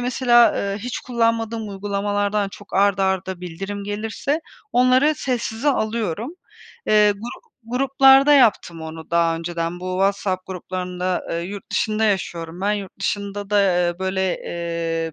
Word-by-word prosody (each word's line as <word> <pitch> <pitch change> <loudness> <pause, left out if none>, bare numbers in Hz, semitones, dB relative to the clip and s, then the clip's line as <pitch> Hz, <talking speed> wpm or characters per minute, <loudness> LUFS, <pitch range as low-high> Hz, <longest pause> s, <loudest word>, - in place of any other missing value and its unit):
mesela, 245 -1 +4
eee, 200 0 -2
hiç 245 +3 -4
kullanmadığım 230 -2 -1
uygulamalardan 205 +1 -1
çok 200 +1 -12
art 200 0 +3
arda 190 -1 -1
bildirim 195 +4 -6
gelirse 220 +9 -2 0.3
onları 255 +5 +4
sessize 245 +1 -2
alıyorum. 225 - -1 0.5
Eee, 210 -1 +5
gru 225 +4 -8 0.3
gruplarda 270 +2 +5
yaptım 215 - +3
onu 160 0 -8
daha 170 -1 +2
önceden 170 +1 -4
bu 185 0 -4
WhatsApp 195 -1 0
gruplarında 180 0 -3
Eee, 170 - -1
yurt 195 +3 -7
dışında 215 0 0
yaşıyorum 175 -4 -2
ben. 200 +2 +1
Yurt 200 -2 -6
dışında 200 0 -3
da, 205 -1 +4
eee, 175 -2 +1
böyle, 190 0 -1 0.2
eee, 165 -1 -3
200 Hz, 135 wpm, -22 LUFS, 180-225 Hz, 0.5 s, Eee